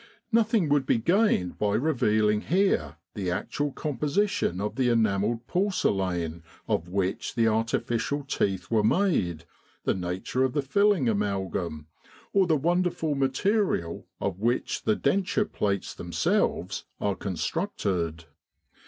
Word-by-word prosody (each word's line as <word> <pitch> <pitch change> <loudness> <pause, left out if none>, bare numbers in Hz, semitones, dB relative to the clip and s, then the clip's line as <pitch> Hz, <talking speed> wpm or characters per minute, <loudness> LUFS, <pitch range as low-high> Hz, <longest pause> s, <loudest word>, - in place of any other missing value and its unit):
Nothing 225 -5 +3
would 140 -2 +2
be - - +3
gained 170 - +2
by 105 -1 +1
revealing 110 -7 +2
here 170 - +1 0.2
the 95 -3 -3
actual 145 +10 -2
composition 150 - -1
of 105 +1 -3
the 130 -2 +2
enamelled 115 0 +1
porcelain 95 - 0 0.3
of 85 - 0
which 95 0 -2
the 115 -1 +3
artificial 115 +5 0
teeth 100 -8 -1
are 110 -2 +4
made, 105 - +1 0.4
the - - +2
nature 95 +8 -2
of 130 - +1
the 145 -2 0
filling 200 0 +3
amalgam, 95 -7 -1 0.5
or 195 -2 +4
the 160 -2 +3
wonderful 175 0 +1
material 135 - 0
of 95 -2 -2
which 120 +4 -1
the 110 - +3
denture 195 +7 +1
plates 100 - -2
them - - -8
selves - - 0
are 100 - 0
constructed. 90 - -2
115 Hz, 125 wpm, -27 LUFS, 95-160 Hz, 0.5 s, are